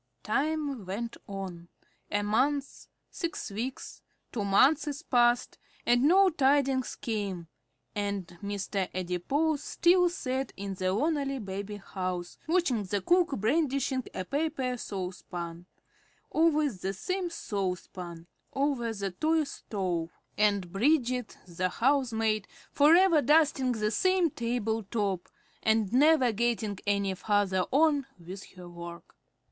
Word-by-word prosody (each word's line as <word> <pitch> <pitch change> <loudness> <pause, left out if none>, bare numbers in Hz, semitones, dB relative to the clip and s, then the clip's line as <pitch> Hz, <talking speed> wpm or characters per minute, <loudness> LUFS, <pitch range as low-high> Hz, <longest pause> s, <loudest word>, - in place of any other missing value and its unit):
Time 285 0 -1
went 230 +5 -4
on. 190 -4 -6 0.4
A 205 0 0
month, 270 +7 0 0.2
six 335 - -4
weeks, 240 +6 -5 0.3
two 215 - -2
months 280 +8 +3
passed, 240 -1 +2 0.3
and 245 0 +4
no 375 +4 +6
tidings 275 -3 +2
came, 205 -9 -3 0.5
and 200 -2 -2 0.2
Mr. 200 -1 -2
Adipose 270 - 0
still 355 +1 +4
sat 265 -5 -3
in 200 0 -4
the 185 0 -1
lonely 275 - 0
baby 200 -2 -5
house, 185 -3 -5
watching 320 - +2
the 200 +1 -1
cook 345 - +3
brandishing 265 +2 +1
a 185 - -3
paper 275 - -1
saucepan 180 -4 -6 0.6
always 305 - +2
the 190 +1 -2
same 365 - -2
saucepan 180 - -4 0.3
over 270 -4 0
the 200 -2 -3
toy 315 - +1
stove, 185 - -3 0.3
and 200 -4 +1
Bridget, 250 0 +1
the 185 +1 -1
"housemaid," 225 -4 +1 0.2
forever 330 +2 +6
dusting 285 -4 +3
the 215 -2 -1
same 370 - +2
table 230 -2 -1
top, 200 -3 -2 0.3
and 220 -2 +2
never 285 -2 +5
getting 220 -2 -1
any 200 -1 +1
farther 195 -1 +1
on 290 -1 +3
with 185 +3 -9
her 180 -1 -10
work. 170 0 -10
225 Hz, 120 wpm, -29 LUFS, 195-285 Hz, 0.6 s, no